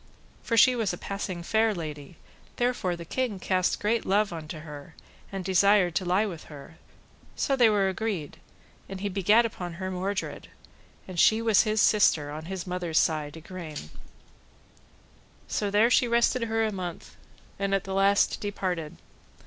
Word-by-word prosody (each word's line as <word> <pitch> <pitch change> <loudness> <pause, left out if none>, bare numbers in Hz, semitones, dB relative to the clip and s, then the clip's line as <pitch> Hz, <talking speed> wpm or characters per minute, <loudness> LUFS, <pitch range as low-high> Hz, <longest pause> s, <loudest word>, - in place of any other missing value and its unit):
For 230 - -1
she 255 +2 +6
was 220 -6 -1
a - - -5
passing 190 -3 -5
fair 220 +3 +2
lady, 155 -1 -7 0.4
therefore 240 -8 0
the 170 0 -9
king 245 +2 -2
cast 185 -1 0
great 225 +2 0
love 200 -1 +1
unto 155 -1 -7
her, 150 +1 -10 0.4
and 195 -2 -5
desired 190 -1 +4
to 185 - -1
lie 185 +4 +2
by 185 -6 -5
her; 155 +1 -13 0.6
so 275 - 0
they 240 -4 +5
were 205 -2 +2
agreed, 190 -5 -3 0.5
and 195 -1 -6
he 205 - -1
begat 205 +5 +3
upon 180 -6 -5
her 185 +2 -5
Mordred, 190 +2 -4 0.6
and 185 -2 -5
she 220 +5 +5
was 225 -3 +4
his 215 0 +1
sister, 160 -8 +3
on 155 +1 -7
his 190 0 -5
mother's 180 -3 -2
side, 155 -1 +1
Igraine. 160 - -8 1.6
So 205 - -1
there 210 +4 +3
she 245 - +4
rested 235 +1 +2
her 225 0 0
a 215 - -1
month, 180 -4 -7 0.4
and 195 0 +1
at 195 - -1
the 195 - -5
last 195 +1 +3
departed. 185 -6 -3
190 Hz, 165 wpm, -27 LUFS, 170-215 Hz, 1.6 s, she